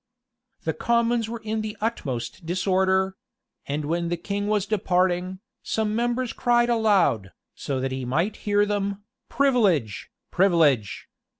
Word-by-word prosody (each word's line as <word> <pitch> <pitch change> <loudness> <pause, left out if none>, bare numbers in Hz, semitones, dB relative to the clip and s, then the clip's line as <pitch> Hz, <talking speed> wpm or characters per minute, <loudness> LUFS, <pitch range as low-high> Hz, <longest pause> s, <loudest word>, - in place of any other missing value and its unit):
[] 240 -1 -46
The 160 - -1
commons 235 -1 +1
were 235 0 -6
in 220 0 -1
the 215 0 -5
utmost 135 - -3
disorder; 190 +2 +1 0.5
and 145 +1 -2
when 170 +2 -1
the 175 - -1
king 200 +4 -3
was 210 -2 +1
departing, 185 -2 0 0.2
some 215 -1 -1
members 240 +1 -1
cried 240 0 +2
aloud, 195 - +2 0.2
so 140 -2 -4
as 130 +1 -2
he 130 0 -3
might 165 - -1
hear 205 0 +2
them, 200 -1 -2 0.3
"Privilege! 200 - +1 0.2
privilege!" 160 - +2
195 Hz, 135 wpm, -24 LUFS, 170-220 Hz, 0.5 s, cried